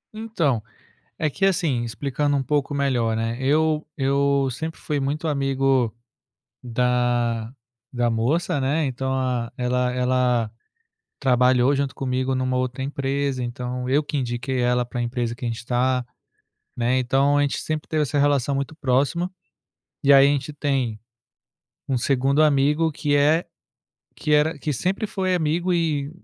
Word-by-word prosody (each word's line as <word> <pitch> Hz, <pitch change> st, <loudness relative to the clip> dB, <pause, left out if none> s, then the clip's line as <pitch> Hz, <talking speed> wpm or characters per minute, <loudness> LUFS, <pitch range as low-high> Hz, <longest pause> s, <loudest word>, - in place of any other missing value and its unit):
Então, 170 Hz, -, 0 dB, 0.6 s
é -, -, 0 dB
que 155 Hz, +6 st, -4 dB
assim, 165 Hz, -11 st, +2 dB
explicando 140 Hz, +4 st, -1 dB
um 135 Hz, -, -1 dB
pouco 145 Hz, 0 st, 0 dB
melhor, 125 Hz, -5 st, +1 dB
né, 115 Hz, +1 st, -1 dB
eu 155 Hz, +3 st, +2 dB
eu 140 Hz, 0 st, +2 dB
sempre 160 Hz, +6 st, -5 dB
fui 150 Hz, -2 st, -2 dB
muito 145 Hz, +4 st, -2 dB
amigo 135 Hz, -4 st, +1 dB, 0.7 s
da 120 Hz, -1 st, 0 dB, 0.4 s
da 120 Hz, -1 st, +1 dB
moça, 145 Hz, +8 st, 0 dB
né, 145 Hz, +4 st, +1 dB
então, 130 Hz, 0 st, -2 dB
a 125 Hz, -3 st, -1 dB
ela 125 Hz, 0 st, 0 dB
ela 125 Hz, -3 st, +1 dB, 0.7 s
trabalhou 125 Hz, 0 st, +3 dB
junto 140 Hz, -1 st, -2 dB
comigo 130 Hz, 0 st, -1 dB
numa 130 Hz, 0 st, -1 dB
outra 130 Hz, +1 st, -2 dB
empresa, 140 Hz, -1 st, -2 dB
então, 125 Hz, +1 st, -4 dB
eu 145 Hz, +3 st, +3 dB
que 150 Hz, -, -5 dB
indiquei 125 Hz, +1 st, -2 dB
ela 125 Hz, 0 st, +2 dB
para 120 Hz, 0 st, -6 dB
a -, -, 0 dB
empresa 120 Hz, -1 st, -2 dB
que 125 Hz, -, -12 dB
a -, -, 0 dB
gente 115 Hz, 0 st, -5 dB
tá, 125 Hz, 0 st, +1 dB, 0.7 s
né, 125 Hz, +2 st, +1 dB
então 135 Hz, +3 st, +2 dB
a -, -, +3 dB
gente 140 Hz, -1 st, 0 dB
sempre 155 Hz, -1 st, -4 dB
teve 155 Hz, -1 st, +1 dB
essa 145 Hz, 0 st, -1 dB
relação 140 Hz, -1 st, +2 dB
muito 140 Hz, +3 st, -3 dB
próxima, 145 Hz, +7 st, 0 dB, 0.7 s
e 140 Hz, -, +6 dB
aí 135 Hz, 0 st, +7 dB
a -, -, +3 dB
gente 145 Hz, +1 st, -2 dB
tem 135 Hz, -7 st, -1 dB, 0.9 s
um 130 Hz, -3 st, 0 dB
segundo 135 Hz, +3 st, +2 dB
amigo 150 Hz, +2 st, +3 dB
que 145 Hz, 0 st, -1 dB
é 150 Hz, +4 st, +3 dB, 0.7 s
que 150 Hz, -, -3 dB
era 150 Hz, +2 st, +3 dB
que 150 Hz, +2 st, -3 dB
sempre 185 Hz, -, -1 dB
foi 190 Hz, -2 st, -1 dB
amigo 170 Hz, +2 st, 0 dB
e 150 Hz, -4 st, 0 dB
135 Hz, 155 wpm, -23 LUFS, 125-145 Hz, 0.9 s, aí